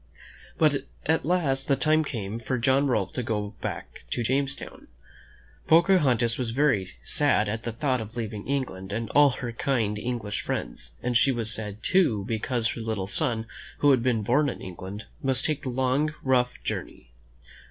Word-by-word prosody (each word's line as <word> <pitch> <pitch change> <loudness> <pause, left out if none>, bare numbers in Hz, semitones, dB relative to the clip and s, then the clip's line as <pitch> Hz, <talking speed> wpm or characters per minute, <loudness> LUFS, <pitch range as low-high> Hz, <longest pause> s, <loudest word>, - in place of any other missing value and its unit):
But 145 -3 +2 0.2
at 160 0 +1
last 140 -7 +1
the 140 - +4
time 155 +2 +3
came 110 -6 -4
for 130 +2 -2
John 135 +4 +3
Rolfe 105 -7 0
to 125 - -2
go 105 -2 -2
back - - -6
to 120 - -1
Jamestown. 135 +3 -2 0.8
Pocahontas 145 -10 +4
was 125 -2 -1
very 115 -8 +1
sad 140 -8 +3
at 110 +2 -2
the 115 - -4
thought 130 +1 0
of 110 +2 -8
leaving 110 -2 -4
England 105 -9 -3
and 115 +1 -3
all 145 0 +6
her 125 -2 -4
kind 115 -4 0
English 115 -3 -3
friends, - - -5
and 125 0 -1
she 135 +3 +5
was 115 -3 0
sad, 105 -1 -5
too, 135 - +3
because 115 +1 -1
her 115 - -4
little 110 -4 -2
son, 115 +2 0 0.3
who 145 - +5
had 130 -3 +4
been 115 -3 +1
born 145 +7 +3
in - - -6
England, 95 +3 -7 0.2
must 130 -1 +1
take 155 -2 0
the 135 - -4
long, 130 +5 +1
rough 125 -2 +2
journey. - - -5
125 Hz, 175 wpm, -26 LUFS, 110-140 Hz, 0.8 s, all